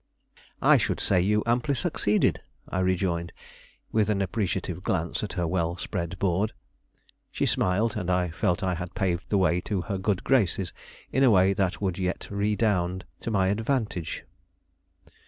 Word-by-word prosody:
"I - - +7
should - - 0
say 90 -3 +3
you 105 +3 +2
amply 125 +5 +1
succeeded," 110 -8 +1 0.3
I 95 - -2
rejoined, 90 -2 0 0.6
with 110 -1 +2
an 105 -2 +1
appreciative 95 -3 -2
glance 85 -3 -1
at 105 - -4
her 90 -2 -1
well 85 0 -1
spread 85 +1 -4
board. 100 +3 0 0.8
She - - 0
smiled, 105 +5 +1
and 90 -4 -3
I 90 -2 +1
felt 85 +3 0
I 95 -1 +1
had 90 +1 -6
paved 90 -2 -1
the 105 - +2
way 90 -2 +2
to 95 0 -2
her 95 +2 -3
good 95 -1 0
graces 100 -8 +1 0.4
in 135 - +2
a 130 - +7
way 95 -2 +5
that 95 -2 -1
would 95 -2 -1
yet 90 0 -2
redound 100 -3 0
to - - -4
my 95 -4 +2
advantage. 110 - -1
95 Hz, 160 wpm, -27 LUFS, 90-105 Hz, 0.8 s, I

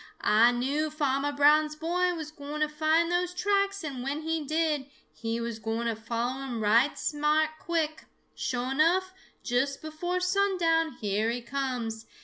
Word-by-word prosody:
Ah 225 +3 +6
knew 275 +6 0
Farmer 290 -2 0
Brown's 300 +2 +4
boy 355 +3 0
was 315 -2 -6
gwine 295 0 -6
to 305 - +3
find 315 +3 +2
those 355 0 0
tracks, 395 0 +1
and 275 -5 -5
when 280 +4 -3
he 320 -1 -1
did, 305 -2 0 0.2
he 230 0 -3
was 235 -1 -4
gwine 225 +2 -2
to 230 -1 0
follow 235 +4 -3
'em 255 -4 -4
right 230 +7 +3
smart 300 +1 +1
quick. 320 -2 -2 0.3
Sho' 250 +1 -2
enough, 355 +6 +2 0.3
just 265 +3 0
before 340 +4 -3
sundown, 360 -4 +2
here 215 -1 -1
he 240 +1 -3
comes. 240 -4 -3
295 Hz, 155 wpm, -28 LUFS, 245-325 Hz, 0.3 s, Ah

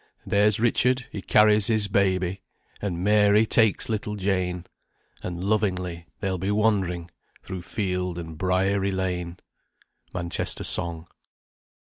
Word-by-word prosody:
There's 105 +1 +2
Richard 125 +2 +2
he 100 - -6
carries 105 0 +4
his 110 -3 +1
baby, 95 -1 0 0.4
And 90 -4 -3
Mary 105 +1 +4
takes 110 -2 +2
little 105 -1 -3
Jane, 95 -3 -1 0.6
And 90 0 -5
lovingly 90 -5 -1
they'll 95 -2 -2
be 95 +3 -2
wandering 95 -5 0 0.3
Through 95 -1 -6
field 90 -2 -3
and 80 -2 -7
briery 95 +3 +1
lane. 90 -2 -3 0.7
MANCHESTER 85 -2 -2
SONG. 85 -2 +3
95 Hz, 115 wpm, -25 LUFS, 90-105 Hz, 0.7 s, carries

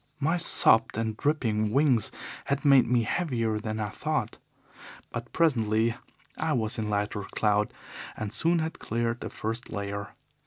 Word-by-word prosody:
My 155 +4 +1
sopped 115 -11 +5
and 110 -1 -2
dripping 110 -7 0
wings 135 -4 +2 0.3
had 140 +2 -2
made 135 -4 +6
me 120 -1 +2
heavier 115 -6 -1
than 110 0 -4
I 105 -1 -2
thought, - - -3 0.7
but 120 0 -6
presently 115 -8 +2 0.4
I - - -1
was 110 -1 -1
in 105 -1 -2
lighter 105 0 -1
cloud, 105 +1 0 0.5
and 110 -2 -4
soon 170 +1 +2
had 160 0 -3
cleared 115 +1 -2
the - - -5
first 115 +3 -5
layer. 100 +1 -5
115 Hz, 150 wpm, -27 LUFS, 110-135 Hz, 0.7 s, made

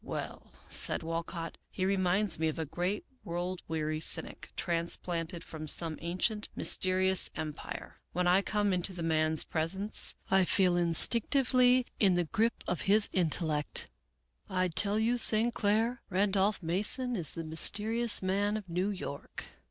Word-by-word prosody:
" - - -34 0.2
Well," - - -9 0.2
said - - 0
Walcott, 165 +1 -5
" - - -48
he 185 - 0
reminds 190 0 +1
me 160 - 0
of 155 - -3
a 160 - -3
great 180 +7 -3 0.2
world 175 +2 -4
weary 155 -1 -3
cynic, 155 0 +1
transplanted 170 0 -1
from 155 -1 -9
some 160 +1 +3
ancient 185 +6 -1
mysterious 185 0 +4
em 155 -1 -4
pire. - - -9
When 180 +1 -2
I 180 +2 +4
come 205 -1 -1
into 180 +1 +1
the 175 -2 -6
man's 155 -1 +2
presence 190 +6 +1 0.2
I 190 0 +4
feel 180 -1 +2
in 170 -1 0
stinctively 250 - +3
the 180 -4 +3
grip 230 +2 0
of 180 - -1
his 210 +1 +3
intellect. 155 - -1 0.6
I 185 -1 -1
tell 200 +6 +1
you, 230 +3 +1
St. 230 0 +2
Clair, 225 +3 0
Randolph 195 +1 0
Mason 215 +9 +1
is 170 -7 -1
the 165 - -6
mysterious 210 +8 +1
man 200 +3 0
of 205 -3 -9
New 180 +3 -2
York." 180 -8 -7
185 Hz, 155 wpm, -30 LUFS, 165-210 Hz, 0.6 s, mysterious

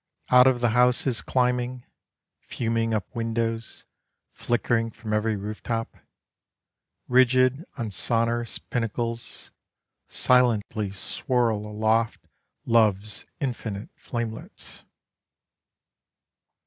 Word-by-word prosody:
Out 125 0 +8
of 125 -2 +2
the 120 - +3
houses 125 +1 +3
climbing, 125 0 0 0.5
Fuming 115 -1 -1
up 110 -1 -2
windows, 115 0 -2 0.5
flickering 120 -1 0
from 110 -1 -6
every 105 +1 +1
roof 105 +2 -6
top, 115 -1 -3 1.1
Rigid 130 +4 +4
on 115 -4 -3
sonorous 115 +3 0
pinnacles, 115 0 -3 0.6
Silently 115 -5 +3
swirl 110 +2 -1
aloft 110 +2 0 0.4
Love's 105 -3 +2
infinite 115 -6 -4
flamelets. 115 -2 -7
115 Hz, 85 wpm, -25 LUFS, 110-125 Hz, 1.1 s, Out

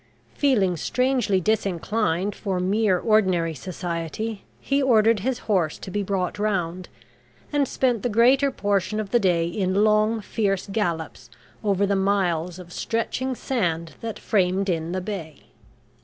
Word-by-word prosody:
Feeling 205 - +2
strangely 250 -3 +1
disinclined 200 -1 0
for 190 -4 -3
mere 195 +1 +2
ordinary 185 -6 +2
society, 175 - -4 0.2
he 275 +1 0
ordered 225 -4 +4
his 250 +5 -1
horse 180 -8 +1
to 190 - -8
be 205 - -1
brought 195 -1 -2
round 185 -4 -1 0.6
and 285 -2 +2
spent 245 -5 0
the 245 - -1
greater 255 +5 +4
portion 205 -3 -1
of 210 -2 -4
the 240 - +4
day 175 -5 +2
in 185 +3 0
long, 215 +1 +3
fierce 195 -2 -1
gallops 170 - -3 0.3
over 200 -1 +2
the 200 0 +1
miles 180 -3 0
of 175 -1 -11
stretching 255 +3 -2
sand 170 - -2
that 225 -1 -5
framed 195 -1 +1
in 165 -1 -1
the 185 +1 -2
bay. 180 -7 -6
200 Hz, 140 wpm, -24 LUFS, 180-220 Hz, 0.6 s, ordered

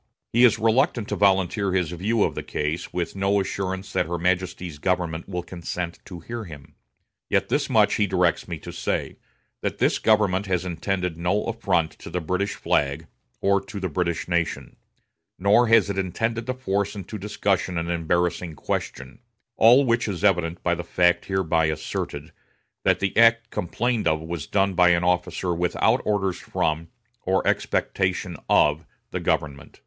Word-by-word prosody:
He 120 +2 +5
is 120 -4 +6
reluctant 115 0 +2
to - - -1
volunteer 95 0 +2
his 90 -4 0
view 105 +6 +1
of - - 0
the - - -4
case, 75 +3 -3
with 90 +1 -3
no 100 +1 +2
assurance 95 0 -3
that - - +1
her 85 +1 -2
Majesty's 90 -2 -2
government 90 -1 -1
will 90 -2 -3
consent 85 -1 -5
to 90 -3 -9
hear 115 +4 -6
him; 75 -6 -12 0.6
yet - - +1
this - - 0
much - - +4
he 105 - +2
directs 90 -2 +1
me - - -4
to - - -9
say, - - -3 0.4
that - - -2
this - - +2
government 100 -3 +2
has 90 -1 0
intended 90 0 -2
no 90 +5 +1
affront 90 -8 0
to - - -9
the 90 - -2
British 90 +5 -2
flag, 70 +2 0 0.4
or 100 0 +3
to 105 -4 -8
the 95 -1 -2
British 85 +1 -2
nation; 85 -2 -2 0.6
nor 105 +6 +4
has 115 -3 +5
it 100 -1 -2
intended 115 +5 -2
to 130 - 0
force 100 -4 -1
into 100 +2 -7
discussion 100 -3 -1
an 85 +1 -2
embarrassing 85 0 -1
question; 70 - -4 0.4
all 125 +5 +6
which 115 -1 +1
is 95 -2 -4
evident 90 -4 +1
by 85 - +2
the 85 0 -3
fact 90 0 +2
hereby 85 -4 +1
asserted, 75 0 -4 0.5
that - - +2
the 95 - -1
act 115 0 +4
complained 115 +4 -1
of 80 -1 +2
was 80 -2 -5
done 100 -1 +1
by 90 0 +5
the - - 0
officer 90 0 0
without 85 +1 +1
orders 95 -3 0
from, 80 +1 -2 0.3
or 95 +1 0
expectation 95 -2 0
of, 75 +2 +4 0.3
the - - -2
government. 70 -2 -2
90 Hz, 170 wpm, -24 LUFS, 85-100 Hz, 0.6 s, is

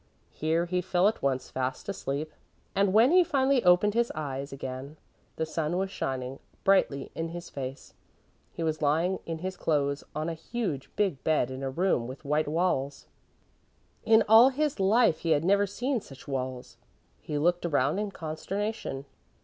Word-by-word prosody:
Here 160 +2 0
he 180 +1 -1
fell 180 +1 +2
at 220 - -1
once 130 -2 -1
fast 130 0 -3
asleep 155 -5 -3 0.4
and 195 0 +2
when 225 +7 +5
he 365 +1 +7
finally 270 -4 +2
opened 180 +3 +5
his 235 +1 +1
eyes 140 -2 -4
again, 135 +2 -6 0.4
the 160 - -1
sun 160 +1 -2
was 190 0 -1
shining 130 -5 -4 0.2
brightly 190 -8 +2
in 165 - -3
his 175 +1 -8
face. 135 -1 -7 0.6
He 170 - -5
was 160 -1 -1
lying 165 +6 +1
in 165 -1 -3
his 185 0 -3
clothes 140 -2 0
on 155 +1 -2
a 170 - -2
huge, 165 - -4
big 190 -10 0
bed 150 -5 +1
in 130 +1 -6
a 135 - -2
room 135 -5 0
with 130 +4 -9
white 150 +2 +1
walls. 145 -4 -1 1.0
In 220 0 +5
all 225 +4 +8
his 290 -1 -1
life 200 -3 +4
he 165 -1 +2
had 145 +3 0
never 200 +2 +3
seen 245 +5 -2
such 135 -5 -14
walls. 130 -2 -4 0.4
He 150 - -4
looked 175 +4 +2
around 145 0 +1
in 210 -1 -2
consternation. 175 -2 -4
165 Hz, 170 wpm, -28 LUFS, 140-200 Hz, 1.0 s, all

